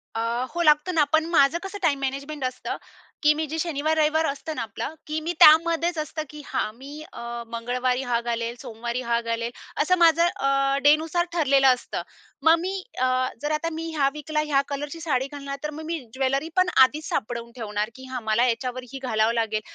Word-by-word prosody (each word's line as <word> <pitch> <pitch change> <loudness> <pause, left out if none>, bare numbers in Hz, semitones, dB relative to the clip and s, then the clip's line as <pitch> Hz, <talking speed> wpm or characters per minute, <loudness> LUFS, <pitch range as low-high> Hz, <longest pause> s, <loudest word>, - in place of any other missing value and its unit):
अ, 225 - -1 0.3
हो, 345 - -1
लागतं 305 +2 +4
ना. 305 - +5
पण 315 0 +4
माझं 285 +2 +5
कसं 390 +1 -6
टाईम 285 -5 +2
मॅनेजमेंट 275 +2 -4
असतं, 255 - -4 0.5
की 300 - +6
मी 310 +1 -2
जे 315 +3 -4
शनिवार, 315 -1 0
रविवार 315 +1 +3
असतं 305 +2 -4
ना - - -3
आपलं, 230 +6 -5
की 310 +1 -2
मी 335 +3 -2
त्यामध्येच 335 +2 +6
असतं 310 0 -3
की 300 +1 -9
हां. 215 - -2
मी 280 +5 -10
अ, - - -8 0.3
मंगळवारी 250 +2 -1
हा 240 -2 0
घालेल, 235 0 -2
सोमवारी 235 +2 -4
हा 235 -1 +1
घालेल, 230 0 -2 0.3
असं 365 +4 +3
माझं 335 0 +5
अ, 275 0 +2
डेनुसार 315 +4 +3
ठरलेलं 275 -5 +4
असतं. 250 - -5 0.4
मग 325 +1 +7
मी 375 +3 -3 0.3
अ, 255 - +4 0.4
जर 295 - -2
आता 310 +2 -1
मी 330 +1 -4
ह्या 275 -2 +3
विकला, 305 +1 -3
ह्या 275 -2 +3
कलरची 290 +3 -5
साडी 270 -5 0
घालणार, 280 -1 -6
तर 300 - -2
मग - - -7
मी 330 0 -2
ज्वेलरी 270 +3 0
पण 370 0 +3
आधीच 300 +4 0
सापडवून 235 +1 -3
ठेवणार, 210 -2 -3
की 260 0 -11
हां, 255 -1 -3
मला 220 +3 +2
याच्यावर 250 +1 -2
ही 270 - -5
घालावं 220 -2 +2
लागेल. 220 -2 0
280 Hz, 200 wpm, -25 LUFS, 245-315 Hz, 0.5 s, मग